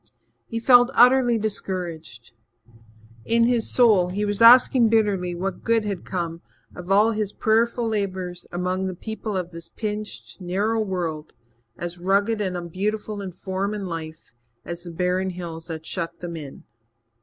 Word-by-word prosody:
He 230 - -3
felt 245 +1 +6
utterly 245 -1 +5
discouraged. 175 - -5 0.9
In 230 - +2
his 235 -1 +1
soul 215 -8 +5
he 205 +3 -2
was 205 +1 -2
asking 240 0 +7
bitterly 200 -5 +1
what 190 +2 -4
good 230 -2 +2
had 200 -4 -4
come 170 -3 -4 0.3
of 180 +1 -7
all 210 +3 +5
his 210 -2 -2
prayerful 230 +2 +1
labours 190 -4 -3
among 185 +2 -1
the 185 - -4
people 220 +1 -5
of 180 -1 -4
this 170 0 -10
pinched, 210 -2 -6
narrow 205 +5 0
world, 175 -6 -3 0.4
as 175 0 -6
rugged 200 +4 +1
and 185 -3 -2
unbeautiful 205 +4 -3
in 190 -2 -5
form 190 +3 -3
and 200 -2 -4
life 160 -4 -7 0.3
as 170 0 -6
the 175 -1 -8
barren 180 +2 0
hills 170 -3 -7
that 160 -1 -6
shut 170 -1 -4
them 170 -1 -6
in. 145 -4 -9
190 Hz, 155 wpm, -24 LUFS, 175-220 Hz, 0.9 s, asking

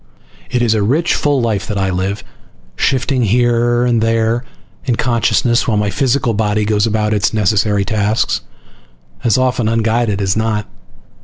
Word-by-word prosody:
It 125 -1 0
is 115 -2 +2
a 110 - 0
rich, 145 +11 +1
full 145 -3 +1
life 110 -4 -1
that 105 -3 -3
I 95 -1 0
live, 95 +3 -2 0.5
shifting 130 - 0
here 120 +2 +2
and 120 -2 +1
there 115 +1 +1 0.4
in 125 -3 0
consciousness 120 0 +1
while 110 -3 +1
my 105 -1 0
physical 130 -1 0
body 105 0 0
goes 105 0 +1
about 105 -1 0
its 105 +1 0
necessary 105 -1 +1
tasks, 105 +1 0 0.8
as 115 -1 +2
often 125 -3 +1
unguided 115 -2 0
as 95 -2 0
not. 110 -1 -1
110 Hz, 155 wpm, -16 LUFS, 105-120 Hz, 0.8 s, is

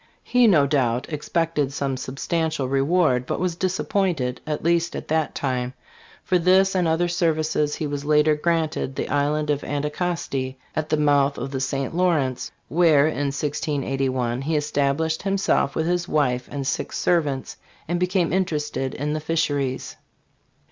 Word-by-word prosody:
He 245 -1 +4
no 155 -9 +5
doubt 130 0 0
expected 150 -2 -1
some 135 -1 -2
substantial 140 +3 -2
reward, 135 -1 +2
but - - -2
was 180 -2 -1
disappointed, 180 -7 -1
at 150 -1 -3
least 170 +1 +1
at - - -6
that 160 -1 0
time, 125 -2 -2
though - - -38 0.5
for - - -1
this 190 +2 +4
and 180 -3 +1
other 160 +2 +2
services 155 -3 0
he 155 - -3
was 145 -1 -3
later 150 +1 +4
granted 155 -3 -1
the - - -2
island 150 +2 +1
of 145 -1 -1
Anticosti 145 -3 -2 0.2
at 155 -1 -2
the 155 - +2
mouth 145 -1 +3
of 135 - -4
the 135 -1 -3
St. 135 +2 -2
Lawrence, 160 -8 +1 0.2
where 160 -4 +4
in 145 -2 0
1681 135 -4 -1
he 155 +3 -1
es 150 0 -2
tablished 145 +3 0
himself 195 -7 +1
with 160 - 0
his 175 +1 0
wife 125 -6 +1
and 140 -1 -4
six 135 - -2
servants, 145 -6 0 0.3
and 175 +2 -1
became 180 -1 +1
interested 150 -7 -1
in 150 +2 -2
the 155 - -1
fisheries. 145 -4 -1
150 Hz, 160 wpm, -23 LUFS, 140-170 Hz, 0.5 s, no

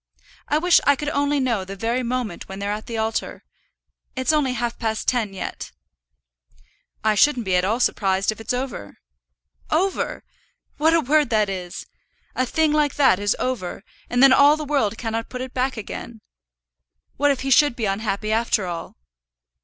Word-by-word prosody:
I 300 - +2
wish 345 +2 +4
I 285 - +5
could 295 +2 -3
know 280 -7 0
the 195 +1 -8
very 230 +5 -1
moment 245 -6 -3
when 190 - -7
they're 200 +1 -3
at 210 +1 -5
the 230 - -4
altar. 220 0 -3 0.7
It's 260 +4 +1
only 285 -4 +1
half 240 -1 -3
past 220 -2 -2
ten 230 -5 +1
yet." 195 - -6 1.3
"I 215 0 +3
shouldn't 250 +1 +3
be 185 -1 +1
at 180 - +2
all 220 +5 0
surprised 195 -4 +1
if 215 - -9
it's - - -3
over." 250 - -4 0.7
"Over! 370 +5 -1 0.5
What 320 +2 +3
a 330 - +3
word 295 -1 +2
that 215 -3 +2
is! 180 -2 -6 0.5
A 255 - -1
thing 315 +3 +1
like 300 -2 +1
that 265 -10 +4
is 205 0 +1
over, 225 -7 -3 0.3
and 245 +2 +3
then 270 -1 +8
all 285 +3 +6
the 305 - -5
world 265 -7 0
cannot 225 -1 -3
put 250 - -6
it 260 0 -6
back 255 0 -1
again. 220 +1 -7 1.0
What 290 +1 +3
if 275 -2 0
he 270 +1 -2
should 290 0 +5
be 230 - -2
unhappy 210 +1 -2
after 220 -3 +1
all?" 170 -2 -6
240 Hz, 175 wpm, -22 LUFS, 210-280 Hz, 1.3 s, then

